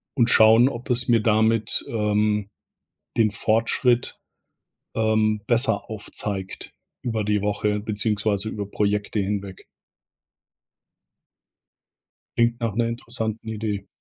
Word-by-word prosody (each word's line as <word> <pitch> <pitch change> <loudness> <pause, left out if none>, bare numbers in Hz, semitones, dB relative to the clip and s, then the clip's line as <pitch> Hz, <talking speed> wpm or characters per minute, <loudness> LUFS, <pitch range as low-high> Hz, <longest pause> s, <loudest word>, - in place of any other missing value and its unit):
und 120 -2 +3
schauen, 110 +3 +7
ob 120 -2 -5
es 120 -1 0
mir 115 -2 +4
damit, 110 0 +2
ähm, 105 -2 0 0.7
den 110 -2 +3
Fortschritt, 115 +3 +1 0.8
ähm, 110 -1 +1
besser 115 -3 +1
aufzeigt 105 -2 -5 0.3
über 110 -3 -2
die 105 0 +1
Woche, 105 +1 -1
beziehungsweise 105 -1 -1
über 100 -2 -5
Projekte 105 +1 -1
hinweg. 100 -1 -3 2.7
Klingt 120 0 +2
nach 115 -4 -2
'ner 115 0 +1
interessanten 115 -2 -4
Idee. 105 -2 -4
110 Hz, 105 wpm, -23 LUFS, 105-115 Hz, 2.7 s, schauen